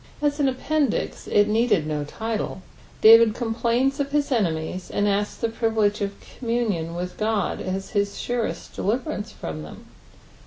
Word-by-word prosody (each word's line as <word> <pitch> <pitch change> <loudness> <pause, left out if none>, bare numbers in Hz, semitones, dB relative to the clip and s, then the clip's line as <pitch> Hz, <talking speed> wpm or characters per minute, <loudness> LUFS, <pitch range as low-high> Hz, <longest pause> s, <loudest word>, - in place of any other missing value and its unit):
As 290 0 0
an 280 -2 +3
appendix 280 0 -1
if 205 - +4
needed 210 -5 +2
no 150 -1 -2
liHe, 220 +4 -4 0.4
Damd 225 0 +8
complains 240 +3 0
i^his 285 +1 0
enemies, 180 -5 -1
and 205 - 0
asJ:s 205 0 0
the - - -1
privUtge 220 -2 +1
qf 200 -1 -1 0.3
communion 220 -9 -1
aith 180 0 -5
God 215 -2 0
as 190 +1 -4
his 200 -1 0
surest 230 -9 -3
detiveranrefrom 210 - -3
them. 75 - -11
220 Hz, 140 wpm, -24 LUFS, 195-240 Hz, 0.4 s, Damd